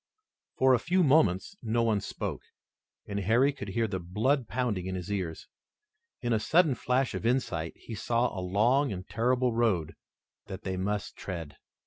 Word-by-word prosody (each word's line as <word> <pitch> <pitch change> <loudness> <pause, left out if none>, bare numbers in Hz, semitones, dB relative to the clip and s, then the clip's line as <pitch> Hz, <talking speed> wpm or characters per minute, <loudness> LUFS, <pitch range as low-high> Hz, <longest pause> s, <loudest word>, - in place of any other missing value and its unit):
For 130 0 +5
a 125 - +4
few 180 +7 +2
moments 145 - +3
no 115 0 +1
one 110 -3 +2
spoke, - - -4 0.6
and 100 0 -3
Harry 120 +8 +3
could 100 -7 -7
hear 115 +3 0
the 95 -3 -3
blood 110 +9 0
pounding 105 -5 -1
in 95 - -3
his 90 +2 -5
ears. 90 -5 -3 0.7
In 120 -2 0
a 110 - +2
sudden 155 +6 +3
flash 125 +2 0
of - - -4
insight 100 -10 0
he 115 - -10
saw 115 +3 0
a 95 - -3
long 120 +10 +2
and 95 -1 -6
terrible 125 +4 +1
road 110 -9 +1 0.5
that 95 0 -7
they 95 -1 -2
must 100 +2 -2
tread. 85 -6 -6
110 Hz, 170 wpm, -29 LUFS, 95-125 Hz, 0.7 s, For